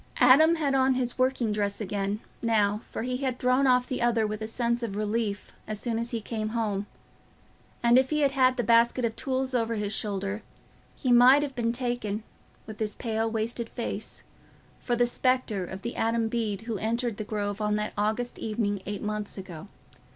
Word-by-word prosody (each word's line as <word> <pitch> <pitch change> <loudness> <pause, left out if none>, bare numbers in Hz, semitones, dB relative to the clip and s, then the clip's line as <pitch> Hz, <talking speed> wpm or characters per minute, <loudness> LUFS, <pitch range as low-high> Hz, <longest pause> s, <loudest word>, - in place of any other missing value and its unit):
Adam 280 +7 +7
had 295 -4 0
on 265 -1 +3
his 250 0 -2
working 255 -3 +1
dress 205 -1 -1
again, 205 0 -2 0.2
now, 210 -2 +2
for - - -4
he 250 +1 -2
had 260 -2 -2
thrown 255 +2 +3
off 250 -1 +4
the 255 - -3
other 235 -2 +2
with 215 0 -4
a 220 - -3
sense 235 +1 -1
of 225 -4 -3
relief 210 0 -2 0.2
as 215 -1 -3
soon 230 -1 -1
as 235 +1 -2
he 235 - -2
came 215 0 -3
home; 205 -3 -1 1.0
and 240 +2 +6
if 260 0 +1
he 300 -1 +1
had 280 -2 +3
had 255 -2 +3
the 245 - +1
basket 235 +2 +4
of 225 -1 -2
tools 260 -1 -1
over 230 -2 0
his 210 -1 -2
shoulder, 200 0 -2 0.5
he 255 - -1
might 255 +4 +7
have 280 -2 -4
been 230 -2 0
taken, 240 -4 -2 0.4
with 215 -1 -9
his 215 -2 -2
pale 225 -1 -1
wasted 225 +1 -3
face, 220 -2 -5 0.6
for 240 - -1
the 240 0 +3
spectre 245 -5 0
of 190 +2 -8
the 235 - -4
Adam 225 0 +1
Bede 220 -4 -2
who 225 -3 -4
entered 230 0 -1
the 215 - -3
Grove 205 -1 -3
on 210 0 +1
that 210 0 -2
August 220 +4 -1
evening 210 -3 -1
eight 205 -1 -4
months 210 -1 -3
ago. 185 -1 -8
230 Hz, 195 wpm, -27 LUFS, 210-250 Hz, 1.0 s, Adam